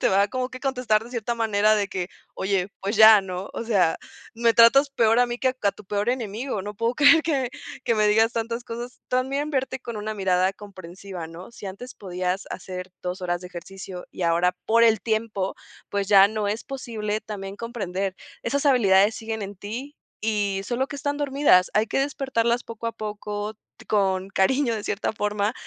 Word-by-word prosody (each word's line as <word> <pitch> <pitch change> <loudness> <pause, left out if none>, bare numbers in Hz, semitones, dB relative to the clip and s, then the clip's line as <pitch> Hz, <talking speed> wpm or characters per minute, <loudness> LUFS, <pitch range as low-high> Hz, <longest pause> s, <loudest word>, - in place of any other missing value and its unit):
te - - +3
va 200 +1 +3
como 255 +3 -2
que 255 - -9
a - - -31
contestar 250 -5 +1
de 240 - -12
cierta 235 -1 -2
manera 215 -2 +3
de 205 -2 0
que: 185 -2 -3 0.3
"Oye, 190 -1 0
pues 200 +3 -2
ya, 220 -1 +9
¿no?, 185 0 -6
o - - -4
sea, 190 -8 +2 0.4
me 230 0 +2
tratas 275 +5 +6
peor 230 -3 +3
a 245 - +5
mí 240 0 -4
que 260 - +2
a 200 - +3
tu 210 - -15
peor 205 +3 -1
enemigo, 230 -2 -3
no 205 +1 -6
puedo 230 +4 0
creer 305 +2 +6
que 270 -6 0 0.3
que 230 - +2
me 215 -1 +3
digas 225 +2 +4
tantas 230 +1 -3
cosas". 240 +1 -7
También 270 +4 0
verte 265 -2 -2
con 235 -3 -6
una 215 +1 -4
mirada 190 -1 +2
comprensiva, 190 -3 -9
¿no?, 165 +5 -11
si 210 - -9
antes 200 +7 -8
podías 185 0 -3
hacer 185 -1 -7
2 180 +1 -4
horas 175 0 -2
de 180 - -8
ejercicio 180 +1 -9
y 185 - -6
ahora 170 +2 +2
por 230 +1 +4
el 220 -3 +4
tiempo, 220 -4 -1 0.4
pues 200 -1 -1
ya 195 -1 +8
no 215 -1 -2
es 215 +3 -3
posible, 220 -6 -4
también 200 -2 -7
comprender 195 -5 -3 0.3
esas 280 +5 -1
habilidades 205 -5 +5
siguen 220 -1 -4
en 200 0 -7
ti 240 +9 -7 0.3
y 205 -3 0
solo 250 +5 -1
que 285 - -8
están 285 0 -2
dormidas. 280 -10 +3
Hay 215 +1 +3
que - - 0
despertarlas 260 -4 0
poco 230 0 -7
a 230 - -1
poco, 210 -1 -5 0.2
t - - -16
con 190 -2 +1
cariño 240 +6 +2
de 210 - -5
cierta 205 +2 -1
forma, 210 0 -1
215 Hz, 200 wpm, -24 LUFS, 195-240 Hz, 0.4 s, ya